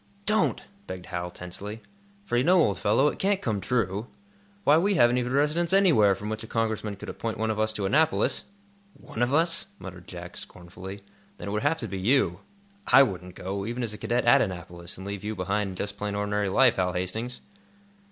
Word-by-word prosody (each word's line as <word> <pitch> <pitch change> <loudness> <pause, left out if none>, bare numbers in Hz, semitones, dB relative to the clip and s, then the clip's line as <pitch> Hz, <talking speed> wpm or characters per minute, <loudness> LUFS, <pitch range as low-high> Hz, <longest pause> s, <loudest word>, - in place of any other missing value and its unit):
"Don't!" 215 0 +2 0.2
begged 90 -1 -7
Hal, 90 -1 -4
tensely. 100 +5 -7 0.4
"For 155 - -2
you 120 - +3
know, 180 +4 +5
old 105 - +2
fellow, 115 +8 +3
it - - -7
can't 195 0 +2
come 110 - -2
true. 105 0 -1 0.6
Why, 145 - +6
we 200 +3 +2
haven't 120 -5 +4
even 125 0 -2
a - - 0
residence 160 +5 +2
anywhere, 145 - +5
from 105 - -7
which 110 0 -3
a - - -8
Congressman 110 -2 -1
could 100 - -10
appoint 115 -1 -4
one 110 0 0
of 110 - -3
us 110 0 +2
to 105 -2 -2
Annapolis!" 155 +10 +2 0.5
"One 115 - -8
of 120 +1 +2
us?" 165 +5 +2
muttered 90 -2 -10
Jack, 90 0 -9
scornfully. 95 +3 -9 0.3
"Then 100 - -6
it - - -3
would 105 +1 -1
have 155 +3 +2
to 115 - -3
be 95 -2 -5
you. 95 -4 +2 0.5
I 135 - +8
wouldn't 90 -6 -4
go, 100 +2 -4
even 120 +4 -3
as 110 -3 -3
a - - -7
cadet 120 +1 0
at 120 - +6
Annapolis, 85 -3 -5
and 95 - -8
leave 100 -1 -5
you 110 +1 -3
behind 100 +2 -1
in 95 - -7
just 100 +2 -4
plain, 105 0 -3
ordinary 105 0 0
life, 125 +4 +4
Hal 90 -1 +1
Hastings!" 110 +7 -3
105 Hz, 210 wpm, -27 LUFS, 95-125 Hz, 0.6 s, I